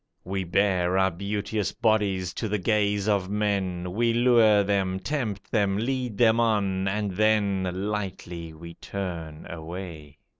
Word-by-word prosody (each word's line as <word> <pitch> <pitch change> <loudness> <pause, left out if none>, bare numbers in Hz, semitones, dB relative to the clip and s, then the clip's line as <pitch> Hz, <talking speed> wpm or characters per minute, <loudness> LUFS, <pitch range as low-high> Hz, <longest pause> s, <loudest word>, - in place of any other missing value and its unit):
We 95 0 -3
bare 90 0 +2
our 95 0 +3
beauteous 100 +2 -2
bodies 100 -5 +1
to 110 - -3
the 105 - 0
gaze 105 0 +1
of 100 -3 +1
men, 95 -4 -1
We 115 +4 +1
lure 115 -4 +5
them, 95 -2 0
tempt 105 -3 -3
them, 100 -3 +2
lead 125 -1 -2
them 115 0 +4
on, 100 -4 +1
and 105 +1 -1
then 100 -2 +2 0.2
Lightly 90 -5 -4
we 85 +1 -10
turn 85 -5 -6
away. 80 -3 -8
100 Hz, 140 wpm, -26 LUFS, 90-105 Hz, 0.2 s, lure